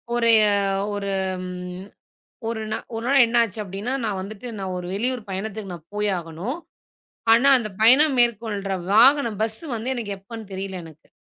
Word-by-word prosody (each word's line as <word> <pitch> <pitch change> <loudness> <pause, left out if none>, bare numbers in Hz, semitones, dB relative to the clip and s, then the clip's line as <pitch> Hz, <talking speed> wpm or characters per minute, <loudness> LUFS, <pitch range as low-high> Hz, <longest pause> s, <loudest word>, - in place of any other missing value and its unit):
ஒரு 230 -1 +2 0.2
அ - - +3 0.4
ஒரு 200 -1 -3 0.4
ம் 180 +1 -7 0.6
ஒரு 230 -1 -3 0.4
ஒரு 230 +2 -4
நாள் 275 -2 +6
என்ன 235 +1 +1
ஆச்சு 220 -2 -3
அப்படின்னா, 200 +6 -4
நான் 205 -3 -1
வந்துட்டு 205 +4 -8
நான் 190 -1 -4
ஒரு 180 - -6
வெளியூர் 245 +4 -1
பயணத்துக்குப் 195 0 -4
நா 175 - -8 0.2
போய் 210 0 0
ஆகணும். 175 - -5 0.7
ஆனா 235 +5 +5
அந்த 225 -3 -4
பயணம் 265 +6 +6
மேற்கொள்ற 215 -4 +1 0.2
வாகனம், 235 -1 +5
பஸ் 220 0 -2 0.2
வந்து 245 +4 -2
எனக்கு 220 -5 -4
எப்பன்னு 220 +3 -9
தெரியல 190 -1 -5
எனக்கு. 160 -1 -15
215 Hz, 160 wpm, -23 LUFS, 195-235 Hz, 0.7 s, நாள்